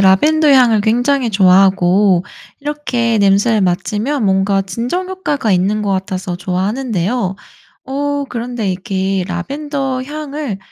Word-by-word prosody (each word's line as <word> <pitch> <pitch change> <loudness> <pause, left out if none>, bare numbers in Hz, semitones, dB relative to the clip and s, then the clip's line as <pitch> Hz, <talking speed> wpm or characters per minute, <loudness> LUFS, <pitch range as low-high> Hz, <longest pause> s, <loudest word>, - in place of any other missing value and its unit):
라벤더 300 +12 +4
향을 245 -5 +5
굉장히 245 +3 +1
좋아하고 190 -1 +4 0.4
이렇게 260 -6 -1
냄새를 200 +2 +3
맡으면 210 +8 -1
뭔가 195 0 +2
진정 245 - -3
효과가 295 - -1
있는 195 +4 +1
거 205 -1 -2
같아서 185 -1 -3
좋아하는데요. 195 +2 -2 0.5
어 285 +1 -2
그런데 235 -3 -3
이렇게 190 0 -2
라벤더 270 - -3
향을 290 -5 -5
215 Hz, 290 characters per minute, -16 LUFS, 190-270 Hz, 0.5 s, 향을